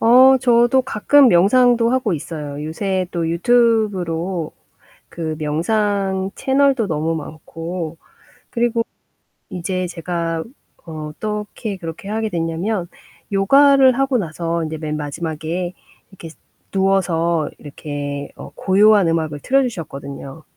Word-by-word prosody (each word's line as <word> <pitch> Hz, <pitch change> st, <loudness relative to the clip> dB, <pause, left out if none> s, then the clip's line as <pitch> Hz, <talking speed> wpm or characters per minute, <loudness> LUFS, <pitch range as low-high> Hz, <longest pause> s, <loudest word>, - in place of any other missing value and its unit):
어 255 Hz, +3 st, +7 dB
저도 245 Hz, +1 st, +4 dB
가끔 265 Hz, +4 st, +4 dB
명상도 235 Hz, +5 st, +4 dB
하고 250 Hz, -5 st, +1 dB
있어요. 150 Hz, -2 st, -5 dB
요새 185 Hz, +4 st, -2 dB
또 170 Hz, -2 st, -1 dB
유튜브로 185 Hz, -5 st, +1 dB, 0.6 s
그 160 Hz, -2 st, -4 dB
명상 190 Hz, +4 st, 0 dB
채널도 270 Hz, -4 st, +2 dB
너무 160 Hz, 0 st, -1 dB
많고 165 Hz, +2 st, -6 dB, 0.5 s
그리고 235 Hz, -1 st, 0 dB, 0.6 s
이제 185 Hz, +1 st, -3 dB
제가 170 Hz, -1 st, -3 dB, 0.4 s
어떻게 200 Hz, +7 st, -5 dB
그렇게 165 Hz, +1 st, -8 dB
하게 220 Hz, +1 st, -2 dB
됐냐면 175 Hz, +3 st, -2 dB, 0.4 s
요가를 265 Hz, +6 st, +5 dB
하고 270 Hz, -1 st, +1 dB
나서 170 Hz, -2 st, -2 dB
인제 160 Hz, 0 st, -5 dB
맨 155 Hz, -1 st, -3 dB
마지막에 160 Hz, +3 st, -4 dB, 0.4 s
이렇게 175 Hz, -4 st, -11 dB, 0.4 s
누워서 170 Hz, -4 st, +1 dB
이렇게 145 Hz, -1 st, -6 dB
어 -, -, -10 dB
고요한 200 Hz, 0 st, +4 dB
음악을 160 Hz, -3 st, -1 dB
틀어 270 Hz, +1 st, +3 dB
주셨거든요. 140 Hz, -, -6 dB
180 Hz, 250 characters per minute, -19 LUFS, 160-220 Hz, 0.6 s, 어